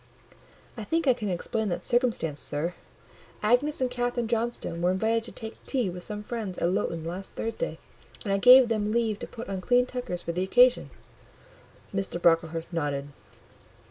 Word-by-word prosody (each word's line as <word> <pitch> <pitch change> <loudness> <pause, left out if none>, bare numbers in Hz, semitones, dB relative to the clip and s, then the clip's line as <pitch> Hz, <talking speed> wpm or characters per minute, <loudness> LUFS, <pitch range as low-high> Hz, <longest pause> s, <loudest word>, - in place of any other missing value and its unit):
"I 225 - -6
think 325 +9 0
I 260 - +6
can 215 -4 -4
explain 205 +4 -2
that 175 - -3
circumstance, 235 - 0
sir. 155 +4 -2 0.7
Agnes 255 +7 +2
and 255 -1 +1
Catherine 245 -1 -1
Johnstone 230 -7 -2
were 175 - +3
invited 220 +4 +1
to - - -10
take 220 -1 -9
tea 245 -9 0
with 180 0 -7
some 210 +3 -6
friends 210 -5 -5
at 170 - +1
Lowton 165 -3 -1
last 180 +4 -6
Thursday, 230 - -3 0.5
and 200 -4 -1
I 195 - +2
gave 250 +3 +9
them 215 -2 0
leave 225 -2 0
to - - -6
put 235 - -8
on 195 -1 -4
clean 245 +6 +3
tuckers 245 -9 -5
for - - -2
the 175 +2 -2
occasion." 245 +6 +4 1.0
Mr. 195 -3 -2
Brocklehurst 165 0 +1
nodded. 145 -3 -2
210 Hz, 175 wpm, -27 LUFS, 175-240 Hz, 1.0 s, gave